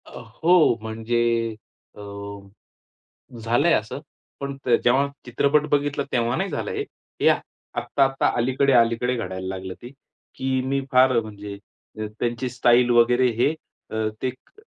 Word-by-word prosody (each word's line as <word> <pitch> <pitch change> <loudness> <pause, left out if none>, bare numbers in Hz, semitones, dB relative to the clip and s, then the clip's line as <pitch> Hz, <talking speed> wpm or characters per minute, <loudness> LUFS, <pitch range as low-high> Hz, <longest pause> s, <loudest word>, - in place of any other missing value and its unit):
अ, - - -10 0.2
हो 170 -6 +5
म्हणजे 110 +2 -2 0.7
अ, - - -14 1.5
झालंय 140 +9 +3
असं. 110 +2 -1 0.4
पण 140 0 -4
त - - -3
जेव्हा 130 +4 +3 0.2
चित्रपट 140 +4 +2
बघितला 145 0 +1
तेव्हा 120 0 +1
नाही 195 +1 -1
झालं 145 - -3
हे. - - -2
हे - - -4
आत्त - - +2 0.4
आत्ता-आत्ता 135 +3 +1
अलीकडे-अलीकडे 125 -1 +2
घडायला 95 -5 -5
लागलं 95 0 -5
ते, 120 - -9 0.5
की 130 0 -1
मी 135 +1 0
फार 130 0 +5
अ, - - +3
म्हणजे 105 -2 -8 0.5
अ, 110 - -2
त्यांची 120 +2 -1
स्टाईल 120 0 +3
वगैरे 120 +2 +4
हे, 145 - +4 0.4
अ, 110 0 0
ते 130 - 0
क 130 - -24
125 Hz, 145 wpm, -23 LUFS, 115-135 Hz, 1.5 s, हो